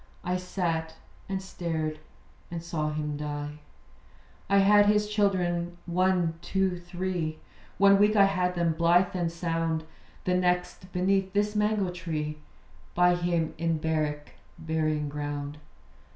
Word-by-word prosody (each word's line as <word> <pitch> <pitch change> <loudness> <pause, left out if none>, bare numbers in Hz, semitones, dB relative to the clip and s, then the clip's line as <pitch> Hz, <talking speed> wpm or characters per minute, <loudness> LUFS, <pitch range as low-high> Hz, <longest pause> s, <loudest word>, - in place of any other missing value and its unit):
I 180 +1 0
sat, 170 -3 -2 0.3
and 190 -1 -2
stared, 160 -4 -3 0.5
and 170 -1 -5
saw 155 -3 -2
him 150 -1 -3
die. 150 0 -5 0.9
I 200 - +4
had 205 +1 +6
his 210 0 +3
children 175 -5 0
one, 180 -2 +1
two, 190 -1 0
three. 175 -2 -3 0.4
One 200 0 +6
week 210 +1 +4
I 200 -1 +7
had 180 -2 0
them, 170 -2 +1
blithe 170 +3 +3
and 170 -2 0
sound. 165 -1 -1 0.4
The 180 - +1
next 180 0 0
beneath 190 +1 +1
this 205 +1 +1
mango 210 -3 +1
tree, 155 -4 -4 0.6
By 180 0 +5
him 175 -2 0
in 165 -1 +1
barrack 155 -2 -2 0.3
burying 155 -2 -1
ground. 145 0 -4
175 Hz, 130 wpm, -28 LUFS, 160-190 Hz, 0.9 s, I